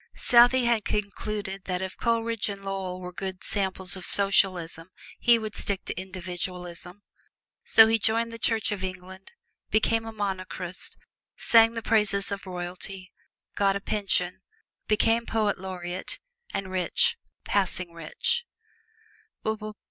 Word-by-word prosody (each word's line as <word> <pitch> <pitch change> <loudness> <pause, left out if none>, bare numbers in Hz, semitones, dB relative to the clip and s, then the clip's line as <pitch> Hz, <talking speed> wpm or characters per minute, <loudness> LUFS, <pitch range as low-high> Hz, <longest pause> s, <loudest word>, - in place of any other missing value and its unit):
Southey 245 +1 +5
had 235 -3 +2
concluded 205 -1 -4
that 180 -1 -2
if 190 0 -5
Coleridge 230 -2 -1
and 200 -1 -7
Lovell 190 -2 -4
were 180 0 -7
good 190 0 -6
samples 190 -2 -1
of 185 - -8
socialism 185 -4 +6 0.3
he 240 -1 +5
would 215 -1 -6
stick 200 -2 -1
to - - -3
individualism. 180 0 -7 0.6
So 225 - +8
he 225 0 +2
joined 230 +2 0
the 230 - -8
Church 225 -1 0
of 195 -2 -4
England, 185 +1 -8 0.4
became 225 +1 +1
a - - -5
Monarchist, 190 -3 -5 0.4
sang 230 0 +5
the 230 - -4
praises 210 -3 +2
of 200 -1 -5
royalty, 185 +1 -4 0.4
got 195 -1 +2
a - - -1
pension, 195 -3 -1 0.5
became 225 +2 +2
Poet 215 -3 0
Laureate, 185 -1 -6 0.3
and 190 -1 -4
rich 470 - +2 0.3
passing 180 -3 -1
rich. 170 - -2
195 Hz, 130 wpm, -26 LUFS, 185-220 Hz, 0.6 s, So